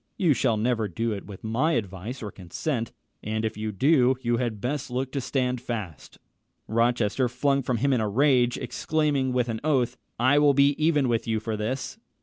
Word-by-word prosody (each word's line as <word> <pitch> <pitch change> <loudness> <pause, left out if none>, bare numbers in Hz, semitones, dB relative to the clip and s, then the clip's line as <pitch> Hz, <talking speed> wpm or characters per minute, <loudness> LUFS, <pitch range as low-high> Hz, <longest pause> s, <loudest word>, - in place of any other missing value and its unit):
You 170 -6 +3
shall 115 -3 +1
never 115 0 0
do 115 +6 -2
it 100 -2 -5
with 100 -3 -10
my 125 +9 +1
advice 105 - -4
or 105 - -5
consent; 115 - -4 0.3
and 110 +1 -2
if 110 - -2
you 110 +1 -3
do, 130 - +3
you 120 0 +1
had 115 -4 -2
best 135 +5 -3
look 130 +1 -2
to 140 - -2
stand 125 -2 -1
fast." 105 - -6 0.5
Rochester 120 +1 +1
flung 140 +3 +1
from 125 -2 -1
him 140 +4 +2
in 120 - +2
a 105 - 0
rage, 125 +1 +3
exclaiming 150 -4 0
with 125 -1 +1
an 110 -2 -3
oath, 135 -6 +1 0.2
"I 130 +5 +4
will 145 -1 +4
be 140 +1 +6
even 150 -4 +3
with 115 -1 0
you 110 -1 0
for 110 0 -3
this." 130 - -4
125 Hz, 195 wpm, -26 LUFS, 110-135 Hz, 0.5 s, be